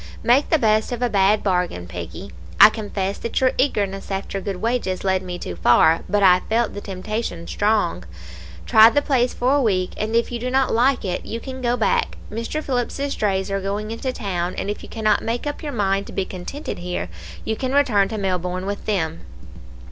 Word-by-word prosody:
Make 255 +4 +3
the 320 - +4
best 215 -3 +2
of 245 0 -2
a 245 - +1
bad 200 +1 +3
bargain, 180 - 0
Peggy; 85 -1 -8 0.3
I - - +11
confess 200 -3 -3
that 230 - -2
your 255 -1 +3
eagerness 200 -7 0
after 195 0 -3
good 195 0 -3
wages 225 -2 -2
led 190 -1 +1
me 180 -1 -6
too 90 - -6
far, 120 - +4
but 205 +1 +2
I 180 -1 +7
felt 230 +1 +1
the 205 - -6
temptation 195 -1 -4
strong. 205 - 0 0.6
Try 220 +1 +8
the 290 +4 +1
place 250 -3 +2
for 255 +2 +2
a 285 - +3
week, 185 -6 +1
and 220 +2 -2
if 235 +1 +1
you 240 - -3
do 250 +2 -3
not 265 0 +2
like 250 +2 +2
it, 180 -1 -2
you 230 - -4
can 260 +1 -7
go 245 0 +1
back. 225 - +1
Mr. 230 +8 -3
Phillips's 275 +2 -2
drays 195 -2 -1
are 195 0 -1
going 205 +3 -3
into 240 +3 -3
town, 185 -6 -3
and 200 - -2
if 210 - -6
you - - -11
cannot 220 -2 +1
make 235 +4 -3
up 290 0 -4
your 300 - -4
mind 200 -4 0
to - - -9
be 195 - -1
contented 190 +12 -6
here, 175 - -3 0.4
you 220 - -1
can 260 +2 -3
return 240 -9 +3
to 220 - -5
Melbourne 185 -2 -2
with 200 +1 -5
them.' 165 -6 -1
210 Hz, 210 wpm, -22 LUFS, 190-240 Hz, 0.6 s, I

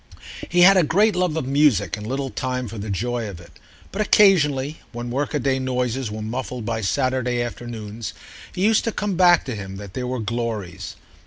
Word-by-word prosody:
He 175 +1 +3
had 195 +2 +8
a 180 - +5
great 205 +6 +3
love 180 -3 0
of 160 - -2
music 135 - +3
and 105 0 -8
little 135 +1 -3
time 125 -1 -3
for 110 0 -7
the 105 +2 -5
joy 115 +3 -2
of 90 -4 -9
it; 85 - -16 0.3
but 205 - -2
occasionally, 155 -9 +4
when 120 0 -6
workaday 135 0 0
noises 125 -1 -1
were 105 0 -5
muffled 125 +1 -4
by 115 -1 -2
Saturday 130 +2 0
afternoons, 115 -2 -5 0.4
it 185 - -3
used 215 +2 +4
to 230 - 0
come 210 -2 -2
back 175 -1 +5
to 130 - -4
him 95 -2 -7
that 100 -1 -9
there 125 +1 -3
were 130 +1 -2
glories. 110 -5 -4
125 Hz, 190 wpm, -22 LUFS, 110-150 Hz, 0.4 s, had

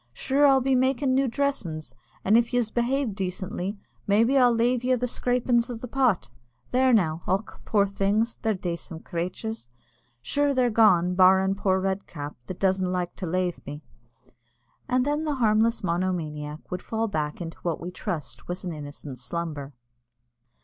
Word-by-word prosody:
Sure 275 - +3
I'll 270 -1 +5
be 265 +1 +1
makin' 260 +1 +2
new 270 +1 +3
dressin's; 230 - -2 0.3
and 210 - +5
if 235 +1 +3
yez 235 -3 +1
behave 245 0 0
decently, 190 +1 -4 0.3
maybe 225 +6 +4
I'll 250 -2 +6
lave 240 +1 +1
yez 255 -1 +2
the 250 - 0
scrapin' 245 0 +1
o' 245 - -3
the 230 +2 -6
pot. 250 - +1 0.4
There 260 +1 +4
now. 170 -8 +2
Och! 195 +4 -2
poor 205 -2 +3
things, 200 +4 0
they're 220 -2 0
dacent 170 -2 -5
crathurs. 180 - -4 0.5
Sure 285 -1 +1
they're 250 -1 +3
all - - -5
gone, 180 -6 +5
barrin' 190 +1 +5
poor 190 -1 +1
Red 195 +1 -2
cap, 145 -3 -7
that 185 - -6
doesn't 190 -1 +1
like 180 -1 -2
to 185 - -4
lave 180 +1 -1
me." 145 +2 -7 1.1
And 250 0 +2
then 295 +2 0
the 300 -2 -1
harmless 225 -1 +2
monomaniac 165 -4 -3
would 180 0 -3
fall 225 0 -2
back 150 -6 -2
into 165 -2 -7
what 170 -2 -2
we 175 +2 -6
trust 150 -9 -5
was 175 +1 -4
an 180 -2 -4
innocent 145 -3 -8
slumber. 150 -1 -5
195 Hz, 170 wpm, -26 LUFS, 175-245 Hz, 1.1 s, I'll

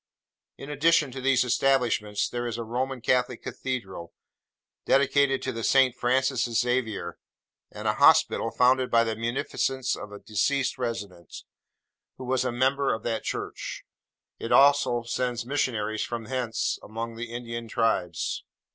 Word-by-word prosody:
In 140 - -8
addition 150 -1 +3
to 130 +1 -7
these 130 -1 +3
establishments, 120 -5 +1
there 120 0 -4
is 115 -1 -4
a 115 - -3
Roman 125 +3 -3
Catholic 125 0 0
cathedral, 95 -10 -5 0.7
dedicated 135 0 +3
to 115 -3 -3
Saint 130 -1 +4
Francis 130 +1 +1
Xavier; 115 -9 -1 0.5
and - - -6
a - - +3
hospital, - - +4
founded 125 +1 +3
by 115 0 +4
the 110 -1 -2
munificence 125 +3 -1
of 105 - -9
a 105 - -8
deceased 130 +7 -1
resident, 100 -8 -5 0.7
who 130 - -8
was 130 0 +1
a 125 - -1
member 135 +3 +1
of 110 - -9
that 115 -1 -2
church. - - -5 0.6
It 115 - -5
also 140 -4 +4
sends 120 0 -2
missionaries 115 -6 -1
from 115 -2 -4
hence 120 -2 -2
among 115 +2 -6
the 115 0 -6
Indian 115 -1 -6
tribes. 110 -8 -1
120 Hz, 140 wpm, -26 LUFS, 115-130 Hz, 0.7 s, Saint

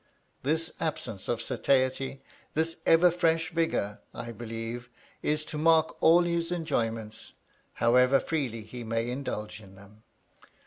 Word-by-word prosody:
This 160 +4 0
absence 110 -10 -3
of 115 -1 -1
satiety, 135 +1 0 0.3
this 160 +1 0
ever 170 +2 +6
fresh 165 -1 +1
vigor, 160 -11 0 0.2
I 120 - -5
believe, 115 +1 -6 0.3
is 150 0 0
to 150 - -5
mark 160 0 +4
all 170 +2 +6
his 170 0 -1
enjoyments, 115 -10 -2 0.4
however 125 +3 +4
freely 130 -9 -2
he 120 +3 -8
may 115 +1 -1
indulge 110 -5 -4
in 95 -2 -15
them. 100 +2 -17
130 Hz, 130 wpm, -29 LUFS, 115-160 Hz, 0.4 s, ever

